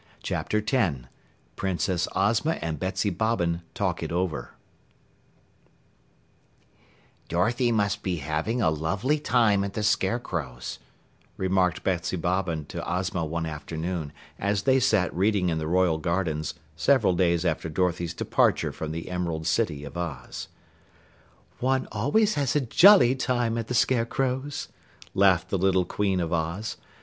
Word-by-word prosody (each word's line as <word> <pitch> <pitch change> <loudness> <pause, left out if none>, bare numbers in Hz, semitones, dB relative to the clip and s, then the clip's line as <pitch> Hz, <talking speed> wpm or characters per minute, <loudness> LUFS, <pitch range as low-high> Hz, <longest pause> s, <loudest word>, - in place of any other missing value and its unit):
CHAPTER 105 - -1
10 95 - 0 0.5
PRINCESS 90 -2 -1
OZMA 115 +10 +2
AND 80 -3 -3
BETSY 95 +3 -1
BOBBIN 90 -7 0
TALK - - -1
IT - - -4
OVER 90 -2 -2 2.7
"Dorothy 120 +8 +1
must 100 -1 +1
be 90 -2 -1
having 80 - -1
a 80 - +3
lovely 95 - 0
time 115 -8 +3
at 100 0 -4
the 110 - -2
Scarecrow's," 90 - -1 0.6
remarked 95 -1 +1
Betsy 90 0 -1
Bobbin 85 -3 -1
to 85 - -5
Ozma 90 0 -1
one 80 +1 -2
afternoon 80 +1 -4 0.3
as 100 0 0
they 130 +3 +4
sat 110 -9 +2
reading 95 -1 +2
in 80 -1 -1
the 80 - -3
Royal 90 -2 +2
Gardens 80 -2 -1 0.2
several 105 - +3
days 85 -1 +2
after 80 -1 -1
Dorothy's 85 0 -1
departure - - +1
from 80 -1 -5
the 80 +1 -5
Emerald 85 -3 -3
City 80 -4 0
of 70 - -9
Oz. 75 -8 -5 1.1
"One 130 +1 +1
always 205 - +2
has 140 -3 0
a 150 - +3
jolly 135 - +7
time 120 -3 0
at 115 -1 -3
the 125 - -2
Scarecrow's," 130 +4 0 0.5
laughed 95 -2 +3
the 95 - 0
little 95 -1 +3
Queen 95 0 0
of 85 -1 -2
Oz. 85 +7 -2
95 Hz, 135 wpm, -26 LUFS, 85-115 Hz, 2.7 s, jolly